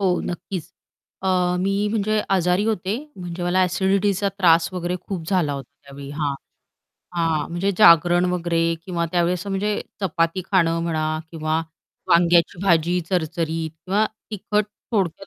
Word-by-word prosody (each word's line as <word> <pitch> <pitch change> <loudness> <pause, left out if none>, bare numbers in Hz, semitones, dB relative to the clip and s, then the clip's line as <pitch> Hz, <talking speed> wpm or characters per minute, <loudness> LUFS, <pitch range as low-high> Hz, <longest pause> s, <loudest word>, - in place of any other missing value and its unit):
हो 185 -3 +2
नक्कीच. 180 -1 -5 0.5
अ, 190 - -3 0.3
मी 195 +2 0
म्हणजे 215 0 +1 0.2
आजारी 180 +3 +2
होते, 210 -1 -1 0.2
म्हणजे 175 -1 -6
मला 180 +1 +2
ॲसिडिटीचा 195 +2 +1
त्रास 165 -3 +5
वगैरे 180 0 -2
खूप 175 -5 -4
झाला 180 -7 +1
होता 140 -1 -6 0.2
त्यावेळी 140 0 -10
हां. 145 -1 -2 0.8
हां, 160 -3 0
म्हणजे 175 +4 0
जागरण 175 -2 +6
वगैरे 170 -1 0 0.2
किंवा 170 -2 -2
त्यावेळेस 175 +1 0
म्हणजे 200 +1 -1 0.2
चपाती 165 -1 0
खाणं 165 -4 +3
म्हणा 155 -2 -1 0.2
किंवा 155 -1 -1 0.5
वांग्याची 170 0 +4
भाजी 175 -1 +2
चरचरीत 165 -2 -1
किंवा 190 +7 0 0.2
तिखट 210 0 0 0.3
थोडक्यात 195 -3 -1
175 Hz, 135 wpm, -22 LUFS, 165-195 Hz, 0.8 s, जागरण